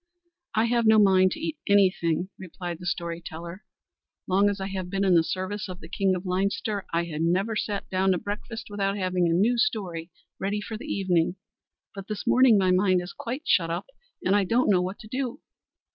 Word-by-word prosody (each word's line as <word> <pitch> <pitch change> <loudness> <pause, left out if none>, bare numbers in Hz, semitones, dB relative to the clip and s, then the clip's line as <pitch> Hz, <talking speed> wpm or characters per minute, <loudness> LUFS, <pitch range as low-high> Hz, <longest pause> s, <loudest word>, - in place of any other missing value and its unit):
"I 220 +1 +3
have 235 -1 +2
no 220 0 +7
mind 190 -2 +5
to - - -7
eat 320 -1 -4
anything," 185 -3 +3
replied 175 -2 -6
the 180 - -7
story 170 -1 -3
teller; 170 +4 -8 0.6
"long 195 +2 +3
as 200 -1 -3
I 190 - -3
have 190 -2 -4
been 195 +1 0
in 190 - +4
the 165 -2 +5
service 190 +3 -3
of 180 0 -7
the 160 - -11
king 190 +1 +1
of 180 +1 -6
Leinster, 200 +2 -1
I 170 +1 0
never 185 +7 +1
sat 205 -1 -2
down 190 0 +2
to - - 0
breakfast 210 +5 -5
without 200 0 -1
having 185 -2 +1
a - - +2
new 225 +7 +2
story 190 - -1 0.3
ready 200 +2 -1
for 220 +2 -6
the 215 - -6
evening, 180 -3 +1 0.6
but 195 -1 -8
this 215 -2 -5
morning 250 -4 +6
my 185 -2 +3
mind 185 0 +3
is 180 +1 -7
quite 255 +6 -5
shut 165 -3 +3
up, 170 - -4 0.4
and 190 - +3
I 205 - +3
don't 230 +3 +2
know 180 -2 +4
what 185 +2 -3
to 215 - -11
do. 255 +3 -3
195 Hz, 205 wpm, -26 LUFS, 180-210 Hz, 0.6 s, no